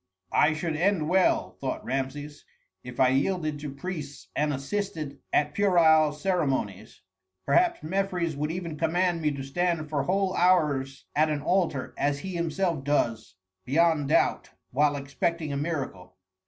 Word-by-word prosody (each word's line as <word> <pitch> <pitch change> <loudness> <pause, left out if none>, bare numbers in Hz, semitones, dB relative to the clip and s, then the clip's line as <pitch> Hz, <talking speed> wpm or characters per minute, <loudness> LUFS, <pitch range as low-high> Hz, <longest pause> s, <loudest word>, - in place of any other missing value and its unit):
"I 155 +1 +4
should 160 0 -2
end 170 -2 +1
well," 185 +1 +2
thought 135 -1 -3
Rameses, 140 +3 -4 0.4
"if 125 -1 -9
I 130 - +5
yielded 155 +2 0
to 145 -1 -5
priests 145 -1 -7
and 150 0 +1
assisted 145 0 -4
at 150 0 +2
puerile 160 -6 +4
ceremonies. 135 - -2 0.4
Perhaps 345 -1 +2
Mefres 180 -2 -1
would 150 +2 -2
even 170 -3 -5
command 175 +1 +1
me 155 - +2
to 140 -1 -5
stand 160 +2 -1
for 145 -2 +1
whole 185 +5 0
hours 150 -8 +2
at 155 +1 +3
an 150 -2 -2
altar, 170 -7 0
as 145 0 +1
he 190 -1 -5
himself 170 -2 -1
does, 115 -9 0 0.3
beyond 155 - +2
doubt, - - +2 0.2
while 145 +2 +2
expecting 145 +3 -2
a - - -1
miracle." 135 - -4
155 Hz, 145 wpm, -27 LUFS, 140-175 Hz, 0.4 s, I